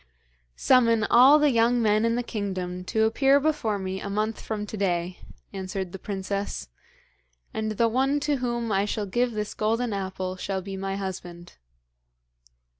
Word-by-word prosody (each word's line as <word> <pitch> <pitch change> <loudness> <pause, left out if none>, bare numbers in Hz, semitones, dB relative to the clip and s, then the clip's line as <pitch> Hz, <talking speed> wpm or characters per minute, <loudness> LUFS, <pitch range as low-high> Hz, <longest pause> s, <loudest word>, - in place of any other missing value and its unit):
'Summon 230 -4 +4
all 260 +5 +8
the 300 -1 +3
young 235 +1 +3
men 215 -1 +2
in 230 0 +1
the 245 - -1
kingdom 185 -5 -4
to 220 +3 +1
appear 270 +5 +4
before 280 -8 0
me 190 0 -4
a 200 - -5
month 215 +2 -2
from 210 -2 -4
to 210 - -7
day,' 180 -3 -1 0.3
answered 190 -1 -4
the 195 - -8
princess; 195 - -4 0.8
'and 220 0 -2
the 230 +2 +2
one 265 +5 +1
to 290 0 0
whom 240 -2 -2
I 195 0 +2
shall 210 0 -2
give 240 +5 0
this 210 -1 -3
golden 225 +2 0
apple 190 -1 -4
shall 190 0 -3
be 195 0 -6
my 195 0 -3
husband.' 175 -3 -7
210 Hz, 165 wpm, -26 LUFS, 190-235 Hz, 0.8 s, all